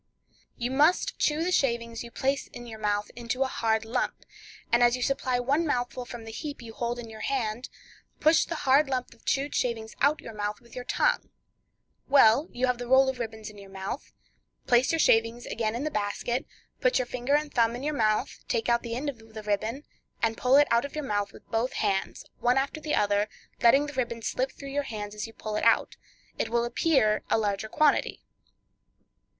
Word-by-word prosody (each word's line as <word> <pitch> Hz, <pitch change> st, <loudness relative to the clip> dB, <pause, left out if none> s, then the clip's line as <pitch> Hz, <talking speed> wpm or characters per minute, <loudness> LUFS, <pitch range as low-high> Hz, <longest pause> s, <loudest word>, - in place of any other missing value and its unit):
You 245 Hz, +1 st, -2 dB
must 300 Hz, +7 st, +3 dB
chew 305 Hz, +2 st, +2 dB
the 360 Hz, -, 0 dB
shavings 235 Hz, -7 st, 0 dB
you 235 Hz, -, -9 dB
place 270 Hz, +3 st, -1 dB
in 240 Hz, -, -10 dB
your 220 Hz, -2 st, -9 dB
mouth 205 Hz, -1 st, -1 dB
into 240 Hz, +2 st, -1 dB
a -, -, -1 dB
hard 220 Hz, -3 st, 0 dB
lump, 240 Hz, +3 st, -2 dB, 0.5 s
and 235 Hz, -, +4 dB
as 240 Hz, 0 st, +5 dB
you 250 Hz, -, -3 dB
supply 260 Hz, -2 st, 0 dB
one 280 Hz, +6 st, +1 dB
mouthful 250 Hz, -4 st, -2 dB
from 240 Hz, -1 st, -8 dB
the 225 Hz, -, -7 dB
heap 290 Hz, +5 st, -6 dB
you 230 Hz, -2 st, -9 dB
hold 240 Hz, +1 st, -2 dB
in 240 Hz, -1 st, -7 dB
your 220 Hz, -1 st, -10 dB
hand, 235 Hz, -1 st, -2 dB, 0.5 s
push 315 Hz, +1 st, +5 dB
the 335 Hz, -, -4 dB
hard 275 Hz, +2 st, +5 dB
lump 255 Hz, -2 st, -2 dB
of 235 Hz, -, -26 dB
chewed 280 Hz, +1 st, 0 dB
shavings 225 Hz, -3 st, -1 dB
out 285 Hz, +2 st, +5 dB
of -, -, -15 dB
your 230 Hz, -, -9 dB
mouth 210 Hz, 0 st, -3 dB
with 235 Hz, -1 st, -20 dB
your 250 Hz, -1 st, -6 dB
tongue. -, -, +1 dB, 0.8 s
Well, 275 Hz, +1 st, +6 dB
you 250 Hz, +1 st, 0 dB
have 250 Hz, -1 st, 0 dB
the 245 Hz, -, -5 dB
roll 265 Hz, +1 st, +5 dB
of 260 Hz, -2 st, -4 dB
ribbons 220 Hz, -2 st, -5 dB
in 205 Hz, -, -14 dB
your 195 Hz, -1 st, -12 dB
mouth; 195 Hz, +7 st, -6 dB, 0.5 s
place 245 Hz, +2 st, +4 dB
your 325 Hz, -, +1 dB
shavings 230 Hz, -4 st, +3 dB
again 225 Hz, -1 st, -2 dB
in 245 Hz, -, -3 dB
the 305 Hz, -, -2 dB
basket, 215 Hz, +4 st, -2 dB, 0.3 s
put -, -, +3 dB
your 255 Hz, -, +1 dB
finger 250 Hz, +3 st, 0 dB
and 295 Hz, 0 st, -1 dB
thumb 230 Hz, -1 st, +3 dB
in 250 Hz, -, -6 dB
your 300 Hz, +1 st, -1 dB
mouth, 215 Hz, -6 st, 0 dB
taking 235 Hz, +1 st, +2 dB
the 230 Hz, -1 st, -4 dB
end 275 Hz, +5 st, -3 dB
of 225 Hz, -5 st, -7 dB
the 215 Hz, -, -6 dB
ribbon, 215 Hz, +6 st, -1 dB, 0.4 s
and 225 Hz, -1 st, +1 dB
pull 250 Hz, +3 st, +3 dB
it 290 Hz, +1 st, +6 dB
out 235 Hz, +1 st, +4 dB
of 280 Hz, -, -7 dB
your 305 Hz, -, -2 dB
mouth 205 Hz, -4 st, -1 dB
with -, -, -15 dB
both 230 Hz, +3 st, 0 dB
hands, 195 Hz, -3 st, -1 dB
one 245 Hz, +2 st, +3 dB
after 275 Hz, +3 st, -1 dB
the 305 Hz, 0 st, 0 dB
other; 205 Hz, 0 st, +2 dB, 0.3 s
letting 260 Hz, +5 st, +6 dB
the 295 Hz, -, -7 dB
ribbon 235 Hz, -3 st, -2 dB
slip 260 Hz, +4 st, -1 dB
through 275 Hz, -, -9 dB
your 285 Hz, +1 st, 0 dB
hands 210 Hz, -6 st, -6 dB
as 210 Hz, +1 st, -5 dB
you 225 Hz, -, -13 dB
pull 215 Hz, -1 st, -5 dB
it -, -, -1 dB
out, -, -, +3 dB, 0.4 s
it 225 Hz, -, 0 dB
will 235 Hz, +1 st, +1 dB
appear 240 Hz, -4 st, +2 dB
a -, -, +3 dB
larger 210 Hz, 0 st, -1 dB
quantity. 300 Hz, +4 st, +2 dB
240 Hz, 215 wpm, -28 LUFS, 220-270 Hz, 0.8 s, Well